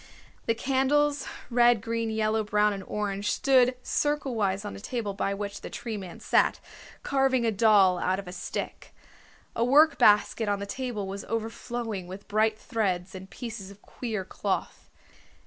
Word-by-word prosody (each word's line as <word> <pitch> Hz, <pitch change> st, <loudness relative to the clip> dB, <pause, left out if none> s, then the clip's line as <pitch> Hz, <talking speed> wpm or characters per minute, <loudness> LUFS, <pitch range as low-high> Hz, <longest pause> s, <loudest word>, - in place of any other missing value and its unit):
The 230 Hz, -, +2 dB
candles, 280 Hz, +3 st, +1 dB, 0.2 s
red, 240 Hz, -1 st, +5 dB
green, 230 Hz, +1 st, -2 dB
yellow, 220 Hz, 0 st, +1 dB
brown 210 Hz, 0 st, +2 dB
and 195 Hz, -, -5 dB
orange, 205 Hz, -1 st, -2 dB
stood 255 Hz, -2 st, +4 dB
circlewise 230 Hz, -10 st, 0 dB
on 205 Hz, -, -5 dB
a -, -, -8 dB
table 215 Hz, -1 st, -3 dB
by 195 Hz, 0 st, -1 dB
which 200 Hz, 0 st, -5 dB
the -, -, -7 dB
Tree 235 Hz, -2 st, -5 dB
Man 190 Hz, -4 st, -8 dB
sat, -, -, +2 dB, 0.4 s
carving 270 Hz, -3 st, +2 dB
a 225 Hz, -, +2 dB
doll 200 Hz, -4 st, +5 dB
out 185 Hz, +1 st, +1 dB
of 195 Hz, -1 st, -7 dB
a -, -, -6 dB
stick. 180 Hz, -, -6 dB, 0.6 s
A 230 Hz, -, +1 dB
workbasket 240 Hz, -5 st, +5 dB
on 205 Hz, -, +1 dB
the 200 Hz, -, -5 dB
table 235 Hz, -1 st, -4 dB
was 195 Hz, +1 st, -5 dB
overflowing 225 Hz, -2 st, -4 dB
with 190 Hz, +2 st, -9 dB
bright 215 Hz, +1 st, +2 dB
threads 195 Hz, -5 st, -2 dB
and 190 Hz, 0 st, -9 dB
pieces 225 Hz, -6 st, -7 dB
of 200 Hz, +1 st, -15 dB
queer 220 Hz, -6 st, -4 dB
cloth. -, -, -3 dB
215 Hz, 160 wpm, -27 LUFS, 200-240 Hz, 0.6 s, red